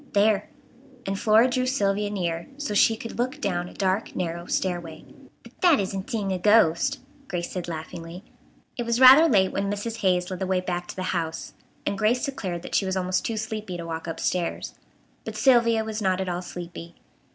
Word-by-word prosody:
"There," 205 Hz, 0 st, +2 dB, 0.6 s
and 195 Hz, 0 st, -2 dB
Flora 220 Hz, +3 st, +5 dB
drew 255 Hz, 0 st, 0 dB
Sylvia 205 Hz, -5 st, 0 dB
near 170 Hz, -4 st, -3 dB
so 290 Hz, -7 st, -3 dB
she 220 Hz, +2 st, +4 dB
could 230 Hz, +1 st, -8 dB
look 255 Hz, +4 st, -1 dB
down 180 Hz, -7 st, -2 dB
a -, -, -14 dB
dark 195 Hz, +2 st, -1 dB
narrow 170 Hz, 0 st, -3 dB
stairway. 175 Hz, -4 st, -3 dB, 0.4 s
"But -, -, -14 dB
that 345 Hz, -6 st, +5 dB
isn't 195 Hz, +1 st, -3 dB
seeing 210 Hz, -6 st, -2 dB
a 185 Hz, -, -1 dB
ghost," 210 Hz, -, +4 dB, 0.3 s
Grace 175 Hz, -5 st, -4 dB
said 180 Hz, -2 st, -4 dB
laughingly. 165 Hz, +2 st, -7 dB, 0.5 s
It 240 Hz, -, -2 dB
was 235 Hz, 0 st, +1 dB
rather 265 Hz, +6 st, +9 dB
late 190 Hz, -5 st, +3 dB
when 195 Hz, 0 st, -1 dB
Mrs. 205 Hz, +3 st, -3 dB
Hayes 180 Hz, -3 st, +1 dB
led 185 Hz, -, -4 dB
the 190 Hz, -, -2 dB
way 185 Hz, -1 st, +1 dB
back 175 Hz, -1 st, -3 dB
to -, -, -8 dB
the 185 Hz, -, -4 dB
house, 165 Hz, -2 st, -3 dB, 0.3 s
and 200 Hz, -, -1 dB
Grace 235 Hz, +6 st, +2 dB
declared 185 Hz, -, -4 dB
that -, -, -9 dB
she 195 Hz, -, +2 dB
was 190 Hz, 0 st, -1 dB
almost 185 Hz, 0 st, 0 dB
too 225 Hz, -, -2 dB
sleepy 215 Hz, -4 st, -4 dB
to 170 Hz, -, -6 dB
walk 165 Hz, 0 st, -5 dB
up 165 Hz, -, -5 dB
stairs. 175 Hz, -2 st, -2 dB, 0.5 s
But -, -, -6 dB
Sylvia 235 Hz, -4 st, +4 dB
was 220 Hz, 0 st, -4 dB
not 190 Hz, -2 st, +1 dB
at 190 Hz, -, -2 dB
all 175 Hz, 0 st, -2 dB
sleepy. 170 Hz, -1 st, -8 dB
195 Hz, 200 wpm, -25 LUFS, 175-225 Hz, 0.6 s, rather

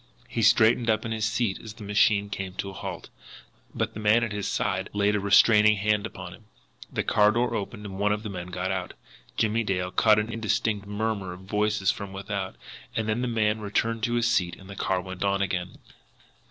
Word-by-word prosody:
He 115 Hz, -, -3 dB
straightened 115 Hz, +1 st, +4 dB
up 110 Hz, +1 st, +1 dB
in 115 Hz, -, -3 dB
his 110 Hz, -1 st, -1 dB
seat 110 Hz, -3 st, 0 dB
as 110 Hz, -2 st, -9 dB
the 115 Hz, -, -10 dB
machine 100 Hz, 0 st, +2 dB
came 95 Hz, -2 st, -4 dB
to 100 Hz, -, -4 dB
a -, -, -12 dB
halt 95 Hz, -3 st, -7 dB, 0.7 s
but -, -, -1 dB
the -, -, -7 dB
man 110 Hz, +2 st, +4 dB
at 115 Hz, -, -2 dB
his 105 Hz, -1 st, -3 dB
side 95 Hz, 0 st, -1 dB
laid 105 Hz, 0 st, +2 dB
a -, -, +1 dB
restraining 105 Hz, +1 st, +5 dB
hand 105 Hz, +1 st, +1 dB
upon 90 Hz, -4 st, -9 dB
him. 110 Hz, -, -16 dB, 0.5 s
The -, -, -1 dB
car 105 Hz, 0 st, +4 dB
door 120 Hz, +2 st, +1 dB
opened, 105 Hz, 0 st, -4 dB
and 95 Hz, -1 st, -7 dB
one 105 Hz, +1 st, +2 dB
of 105 Hz, +1 st, -1 dB
the 105 Hz, -, -5 dB
men 90 Hz, -2 st, -6 dB
got 90 Hz, +1 st, -3 dB
out. 95 Hz, -2 st, -4 dB, 0.4 s
Jimmie 115 Hz, +1 st, +1 dB
Dale 90 Hz, -3 st, -1 dB
caught 110 Hz, +2 st, +4 dB
an 110 Hz, +2 st, -1 dB
indistinct 110 Hz, -2 st, -1 dB
murmur 105 Hz, -3 st, -2 dB
of 90 Hz, -, -11 dB
voices 105 Hz, 0 st, +1 dB
from 100 Hz, -1 st, -7 dB
without, 100 Hz, -1 st, -4 dB, 0.4 s
then 110 Hz, +1 st, 0 dB
the 125 Hz, -, -1 dB
man 110 Hz, -2 st, +1 dB
returned 115 Hz, +2 st, -1 dB
to 120 Hz, -1 st, -1 dB
his 120 Hz, 0 st, +2 dB
seat, 90 Hz, -7 st, +1 dB
and 95 Hz, -, -14 dB
the 100 Hz, -, -9 dB
car 95 Hz, -1 st, 0 dB
went 95 Hz, 0 st, -6 dB
on 100 Hz, 0 st, +1 dB
again. 90 Hz, -2 st, -3 dB
105 Hz, 215 wpm, -26 LUFS, 95-110 Hz, 0.7 s, restraining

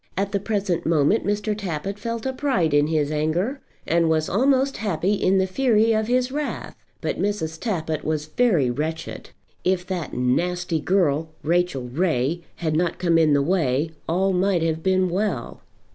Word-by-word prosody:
At 200 Hz, +1 st, 0 dB
the 200 Hz, -, 0 dB
present 195 Hz, -4 st, -1 dB
moment 160 Hz, +7 st, +2 dB
Mr. 210 Hz, +1 st, 0 dB
Tappitt 195 Hz, 0 st, -4 dB
felt 230 Hz, +2 st, -4 dB
a 265 Hz, -, -1 dB
pride 255 Hz, -, 0 dB
in 145 Hz, 0 st, +4 dB
his 155 Hz, -2 st, 0 dB
anger, 170 Hz, -, -1 dB, 0.2 s
and 170 Hz, 0 st, +2 dB
was 155 Hz, -1 st, +1 dB
almost 270 Hz, +5 st, +2 dB
happy 195 Hz, -2 st, 0 dB
in 195 Hz, -1 st, +2 dB
the 190 Hz, -, +3 dB
fury 225 Hz, +2 st, +2 dB
of 220 Hz, 0 st, 0 dB
his 250 Hz, +1 st, +1 dB
wrath; 295 Hz, +1 st, -4 dB, 0.3 s
but -, -, -2 dB
Mrs. 160 Hz, -6 st, -2 dB
Tappitt 160 Hz, -8 st, -2 dB
was 155 Hz, -1 st, -1 dB
very 155 Hz, -, +2 dB
wretched. 160 Hz, +5 st, -4 dB, 0.3 s
If 180 Hz, -1 st, +1 dB
that 180 Hz, -3 st, -4 dB
nasty 170 Hz, +7 st, 0 dB
girl, 160 Hz, -3 st, +1 dB
Rachel 170 Hz, -4 st, +1 dB
Ray, 150 Hz, +3 st, 0 dB
had 160 Hz, -2 st, -2 dB
not 170 Hz, +1 st, 0 dB
come 170 Hz, -2 st, +2 dB
in 155 Hz, -2 st, +4 dB
the 140 Hz, -1 st, +3 dB
way 155 Hz, -3 st, +1 dB, 0.2 s
all 190 Hz, +3 st, +2 dB
might 180 Hz, -2 st, +2 dB
have 160 Hz, -1 st, -1 dB
been 185 Hz, +1 st, +2 dB
well. 180 Hz, -, -2 dB
180 Hz, 170 wpm, -23 LUFS, 155-205 Hz, 0.3 s, in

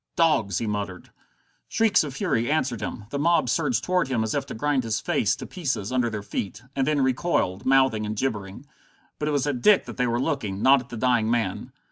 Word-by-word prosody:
"Dogs!" 145 Hz, -, +2 dB
he 115 Hz, -, -2 dB
muttered. 100 Hz, -3 st, -4 dB, 0.6 s
Shrieks 225 Hz, -6 st, +3 dB
of 140 Hz, -3 st, -6 dB
fury 120 Hz, -2 st, 0 dB
answered 125 Hz, -8 st, 0 dB
him. 105 Hz, -, -5 dB
The 140 Hz, -, -2 dB
mob 170 Hz, -4 st, +2 dB
surged 135 Hz, -5 st, 0 dB
toward 180 Hz, -4 st, +1 dB
him 120 Hz, -4 st, 0 dB
as 110 Hz, -, -2 dB
if -, -, -2 dB
to -, -, -6 dB
grind 140 Hz, +2 st, 0 dB
his 110 Hz, -2 st, -1 dB
face 105 Hz, -, +1 dB
to -, -, -8 dB
pieces 135 Hz, -, -3 dB
under 125 Hz, -2 st, +1 dB
their 110 Hz, -2 st, -5 dB
feet 100 Hz, +2 st, -5 dB
and 135 Hz, -1 st, 0 dB
then 150 Hz, -2 st, +2 dB
recoiled, 130 Hz, -, 0 dB
mouthing 130 Hz, -5 st, +3 dB
and 105 Hz, -, -3 dB
gibbering. 105 Hz, -1 st, -3 dB, 0.5 s
But 150 Hz, -, -2 dB
it -, -, +1 dB
was 145 Hz, -2 st, +1 dB
at 140 Hz, -4 st, -2 dB
Dick 205 Hz, +8 st, +5 dB
that -, -, -9 dB
they 125 Hz, -1 st, +1 dB
were 120 Hz, 0 st, 0 dB
looking, 120 Hz, -9 st, -2 dB
not 135 Hz, +1 st, +6 dB
at 125 Hz, -, -11 dB
the 120 Hz, -, -7 dB
dying 120 Hz, -2 st, +2 dB
man. 115 Hz, -5 st, -1 dB
125 Hz, 220 wpm, -25 LUFS, 110-145 Hz, 0.6 s, not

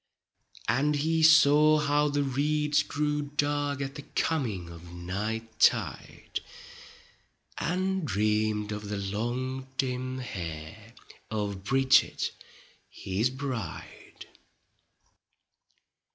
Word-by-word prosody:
And 145 Hz, +4 st, +2 dB
he 160 Hz, +3 st, +1 dB
saw 155 Hz, -1 st, +7 dB
how 150 Hz, 0 st, +2 dB
the 145 Hz, 0 st, +1 dB
reeds 150 Hz, +2 st, +1 dB
grew 150 Hz, 0 st, -1 dB
dark 145 Hz, 0 st, -1 dB
At 135 Hz, 0 st, -3 dB
the 145 Hz, -, -7 dB
coming 115 Hz, -, -2 dB
of 85 Hz, +1 st, -11 dB
night 105 Hz, +6 st, -4 dB
tide. -, -, +1 dB, 1.2 s
And 190 Hz, +2 st, 0 dB
dreamed 105 Hz, -3 st, 0 dB
of 105 Hz, 0 st, -5 dB
the 105 Hz, -, -2 dB
long 120 Hz, +7 st, -3 dB
dim 130 Hz, -1 st, -2 dB
hair 95 Hz, 0 st, -7 dB, 0.3 s
Of 100 Hz, -3 st, -3 dB
Bridget 135 Hz, +3 st, +3 dB, 0.6 s
his 100 Hz, +6 st, -1 dB
bride. 130 Hz, -3 st, -6 dB
130 Hz, 95 wpm, -28 LUFS, 105-145 Hz, 1.2 s, saw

